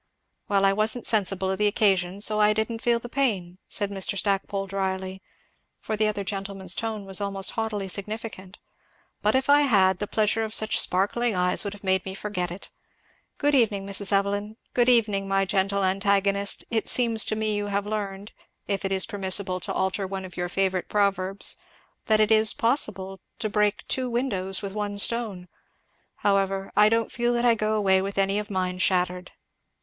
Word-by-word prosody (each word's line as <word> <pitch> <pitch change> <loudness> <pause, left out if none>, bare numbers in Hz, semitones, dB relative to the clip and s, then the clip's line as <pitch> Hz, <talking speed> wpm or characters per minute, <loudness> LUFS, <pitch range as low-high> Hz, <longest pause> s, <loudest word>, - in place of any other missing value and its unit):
"Well 195 -1 +2
I 195 - +4
wasn't 220 +4 0
sensible 195 -3 0
of 190 - -3
the 210 - +3
occasion, 195 -2 +1
so 215 0 +2
I 210 0 +5
didn't 220 +1 -2
feel 235 -1 +2
the 235 - -8
pain," 200 -10 -1
said 205 -2 -3
Mr. 195 0 0
Stackpole 195 0 -1
dryly, 190 -1 -3 0.6
for 215 - -3
the 215 0 +2
other 205 -1 -2
gentleman's 195 -1 -3
tone 220 -3 -3
was 195 +1 -2
almost 195 -1 -1
haughtily 220 -3 -3
significant. 200 -1 -5 0.6
"But 210 +3 +2
if 260 0 +1
I 290 +1 +6
had, 190 -9 +3
the 205 - -3
pleasure 215 +1 +1
of 220 0 -3
such 215 0 +2
sparkling 205 +5 +1
eyes 180 0 +2
would 200 -1 -4
have 205 - -13
made 190 -1 +1
me 190 0 -6
forget 195 -4 -3
it. 175 +3 -9 0.7
Good 290 0 +1
evening, 215 -7 +2
Mrs. 200 0 +1
Evelyn 205 +2 0 0.2
good 245 0 +3
evening, 210 -5 +2
my 195 0 +1
gentle 195 +1 0
antagonist, 200 +1 +1
it 225 -2 -1
seems 230 -3 +1
to 215 - -2
me 215 -1 -1
you 205 0 -2
have 200 0 -1
learned, 205 -1 -4 0.4
if 200 0 -1
it 195 - -2
is 190 -1 +3
permissible 190 -3 0
to - - -3
alter 190 +1 -1
one 190 0 -5
of 180 - -11
your 175 0 -3
favorite 190 0 -1
proverbs, 195 -1 0 0.5
that 215 -1 +4
it 215 0 +3
is 220 0 +5
possible 195 -6 +1 0.2
to 220 -2 -2
break 210 0 0
two 255 -1 -1
windows 200 -7 -2
with 195 -1 -4
one 205 -1 -3
stone. 205 -4 -1 0.8
However, 195 -1 +1
I 210 0 +6
don't 230 0 0
feel 240 0 0
that 240 0 0
I 240 - +6
go 215 -1 -1
away 190 -3 +3
with 195 +1 -5
any 195 +1 +1
of 210 - -6
mine 185 -2 -2
shattered." 180 -1 0
200 Hz, 185 wpm, -25 LUFS, 190-215 Hz, 0.8 s, I